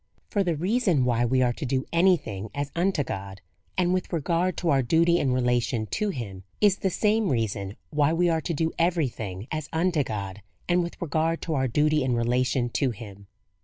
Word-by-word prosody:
For 200 -3 +2
the 175 -3 0
reason 180 - +1
why 120 -1 +2
we 130 +2 +2
are 120 -1 +2
to - - -7
do 130 0 -1
any 180 +2 +5
thing 105 -5 -7
as 145 0 -3
unto 175 -3 +1
God, 95 -4 -6 0.4
and 180 -1 +2
with 185 -1 -2
regard 170 +2 0
to 175 - -1
our 135 -1 +4
duty 170 +7 +3
and 135 - +1
relation 125 -2 +1
to 210 - -1
him, 100 - -6 0.2
is 205 -2 +4
the 190 - 0
same 210 +2 +1
reason 105 -5 -2 0.2
why 150 0 +2
we 175 +2 +2
are 165 -1 +1
to 170 - -3
do 160 +2 0
every 165 -4 +2
thing 100 -2 -7
as 155 -2 -4
unto 165 -2 +1
God, 100 -3 -5 0.3
and 175 0 +3
with 170 0 -5
regard 165 0 0
to 165 - -2
our 130 -3 +1
duty 150 +3 +2
and 125 -2 +1
relation 125 +1 +1
to 135 +2 0
him. 100 -3 -9
145 Hz, 205 wpm, -26 LUFS, 120-170 Hz, 0.4 s, any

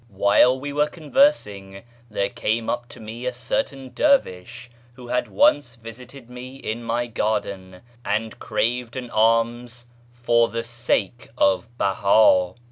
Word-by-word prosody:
While 100 +6 +3
we 145 +1 -6
were 150 +1 +2
conversing, 145 - 0 0.3
there 100 -2 -1
came 115 -1 -2
up 120 0 -4
to - - -13
me 115 +3 -7
a - - 0
certain 135 - -3
dervish, 120 - 0 0.2
who 125 -1 -12
had 125 0 0
once 145 - +2
visited 120 +2 -12
me 125 +1 -10
in 120 -3 -5
my 120 +1 -1
garden, 100 -5 -3 0.2
and 110 +1 -2
craved 120 +1 -2
an 125 -2 -6
alms 115 +2 +1 0.2
" 120 0 -30
for 115 0 +4
the 115 +1 -4
sake 120 -1 -2
of 95 +4 +2
Beha." 95 -2 +3
120 Hz, 140 wpm, -23 LUFS, 110-125 Hz, 0.3 s, for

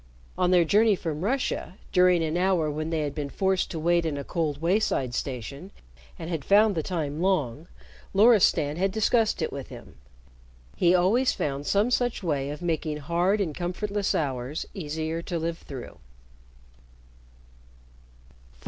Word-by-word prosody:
On 180 - +1
their 180 -2 +4
journey 210 +4 +4
from 160 -3 -4
Russia, 230 -5 -2
during 180 -2 +4
an 160 0 -2
hour 180 -4 +1
when 155 +2 -3
they 160 -1 -1
had 145 -2 -2
been 145 -1 -4
forced 190 +3 0
to 165 - -5
wait 170 +2 +2
in 155 -3 -2
a 140 - -4
cold 150 -2 -2
wayside 165 - 0
station 140 - -5 0.5
and 160 - -7
had 165 -4 -3
found 210 +1 +4
the 165 - -1
time 155 -2 -3
long, 160 -6 0 0.4
Loristan 195 -8 +4
had 195 +2 +1
discussed 220 -2 +1
it - - -3
with 140 -2 -6
him. - - -12 0.8
He 175 0 +4
always 215 +9 +3
found 140 0 -3
some 205 +5 +2
such 245 -4 0
way 145 -5 -1
of 150 +4 -6
making 160 -3 -1
hard 175 +7 0
and 175 -7 -1
comfortless 200 +4 -2
hours 135 0 -2
easier 160 -1 -3
to 170 0 -4
live 165 +1 -3
through. 130 -4 -9
170 Hz, 155 wpm, -26 LUFS, 150-190 Hz, 0.8 s, their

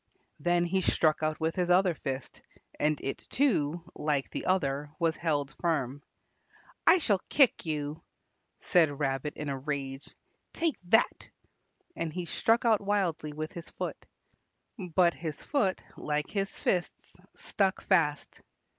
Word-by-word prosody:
Then 175 0 +2
he 190 +2 +1
struck 155 -3 +2
out 155 0 -1
with 160 0 0
his 180 -1 0
other 180 0 +4
fist, 135 -3 -5 0.4
and 150 0 +2
it 135 - -3
too, 175 - 0
like 145 -3 -1
the - - -4
other, 145 -6 0
was 165 -2 +1
held 145 -4 -1
firm. 145 -5 -1 0.9
"I 335 +3 +8
shall 205 - +1
kick 270 - +4
you," 150 0 -3 0.6
said 160 -6 +3
Rabbit 135 +1 -1
in 150 - -4
a 135 -1 -2
rage. 135 -1 -4 0.4
"Take 330 -2 0
that," 225 +6 +2 0.7
and 165 - -3
he 180 +2 -4
struck 230 +7 +2
out 220 -3 +4
wildly 190 -7 0
with 155 +1 -5
his 170 -1 -9
foot. - - -6 0.7
But 175 -1 +2
his 155 -3 -6
foot, 245 -10 0
like 150 0 -2
his 195 -1 -2
fists, 180 -2 -2 0.2
stuck 195 -2 0
fast. 160 -6 +1
165 Hz, 140 wpm, -30 LUFS, 150-185 Hz, 0.9 s, I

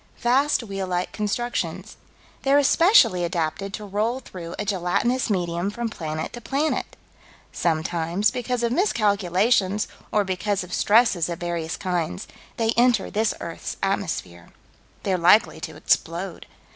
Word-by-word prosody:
Vast 265 +3 +2
wheel 195 -3 -4
like 180 0 -2
constructions. 230 +3 -3 0.5
They're 275 +1 +4
especially 285 - +5
adapted 175 +3 -2
to 210 - -8
roll 215 +5 -1
through 175 -8 -8
a 210 - -3
gelatinous 205 +7 0
medium 175 -1 -1
from 235 +2 -3
planet 155 -3 -4
to 240 - -8
planet. 285 +6 -1 0.6
Sometimes, 170 +4 0
because 250 -1 -2
of 235 - +1
miscalculations, 210 - +2 0.2
or 210 - +3
because 190 +1 -1
of 180 0 -9
stresses 205 -6 +3
of 170 - -4
various 170 -2 -3
kinds, 175 - -2 0.3
they 225 -1 +1
enter 240 -3 +3
this 215 +1 0
earth's 165 - -6
atmosphere. 90 - -2 0.5
They're 185 -2 0
likely 180 +6 +4
to - - -7
explode. - - -1
200 Hz, 135 wpm, -24 LUFS, 175-235 Hz, 0.6 s, especially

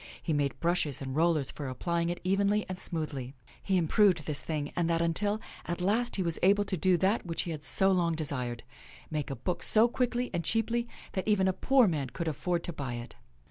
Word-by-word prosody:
He 160 - -2
made 145 -2 -1
brushes 170 -5 0
and 135 -1 -5
rollers 160 -3 +2
for 145 - -6
apply 170 +7 -1
ing 170 - 0
it 175 - -3
evenly 200 +3 +2
and 185 0 -6
smoothly. 145 -7 -3 0.3
He 190 -1 +1
improved 175 -1 +3
this 150 -2 -2
thing 150 -2 -4
and 170 -1 0
that 165 0 +2
until, 205 +6 +1 0.3
at 170 +1 -3
last, 220 +7 +1
he 190 - 0
was 170 -2 0
able 200 +2 +4
to 195 - -2
do 185 +1 +3
that 195 +5 +1
which 165 -2 -1
he 170 - -4
had 155 -2 -5
so 190 +4 +4
long 170 -3 +2
desired 130 -6 -3 0.3
— - - -20
make 150 -2 -2
a 135 - -3
book 170 +9 -3
so 220 +2 +5
quickly 245 0 -1
and 170 -1 -1
cheaply 235 +3 +1 0.2
that 190 0 -3
even 200 -3 +3
a 190 - +2
poor 265 +3 +4
man 145 -7 -1
could 165 +7 -4
afford 170 +3 -1
to 175 - -3
buy 135 -5 -4
it. 120 0 -8
170 Hz, 225 wpm, -30 LUFS, 150-195 Hz, 0.3 s, so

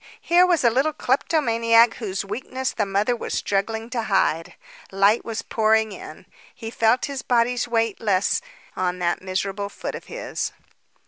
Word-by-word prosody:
Here 355 +2 +4
was 345 -5 +2
a 235 - +5
little 275 +6 +1
kleptomaniac 235 -5 +2
whose 200 -3 -4
weakness 255 +5 -4
the 210 -3 -1
mother 205 +5 +1
was - - -4
struggling 220 +3 -1
to 245 -2 -1
hide. 180 -5 0 0.4
Light 200 +3 +3
was 225 -1 -4
pouring 220 -1 +2
in. 180 -3 -10 0.3
He 225 -1 -7
felt 230 +2 +2
his 280 -2 -5
body's 245 0 +1
weight 225 -3 0
less 200 -3 +1 0.3
on 180 -1 -1
that 175 -1 -1
miserable 195 +2 -3
foot - - -6
of - - -8
his. - - -4
225 Hz, 155 wpm, -23 LUFS, 195-245 Hz, 0.4 s, a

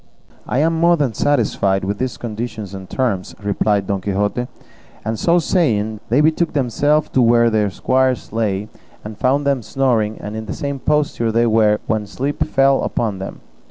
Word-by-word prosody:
"I - - -1
am 160 +4 +2
more 170 +1 +4
than 140 -6 0
satisfied 100 -10 +1
with 100 +1 -3
these 130 -1 -2
conditions 110 -3 -5
and 95 -1 -8
terms," 110 -8 -2
replied 100 0 +1
Don 100 0 -2
Quixote; 105 +5 -1 0.6
and 110 0 -2
so 170 +1 +3
saying, 110 - +1
they 125 +6 +4
betook 160 +2 +2
themselves 145 +3 +1
to 130 - +2
where 115 0 +4
their 105 -2 +1
squires 130 +4 0
lay, 105 -3 -1 0.4
and 105 0 -7
found 135 +6 +1
them 140 -3 +1
snoring, 115 -3 0
and 105 +1 -6
in 110 0 -6
the - - -4
same 140 -3 -4
posture 145 -6 0
they 115 +1 +2
were 110 -2 +4
in 105 - -1
when 110 -2 -1
sleep 135 +8 -2
fell 135 0 +3
upon 105 -5 -2
them. 95 - -7
115 Hz, 180 wpm, -19 LUFS, 105-140 Hz, 0.6 s, more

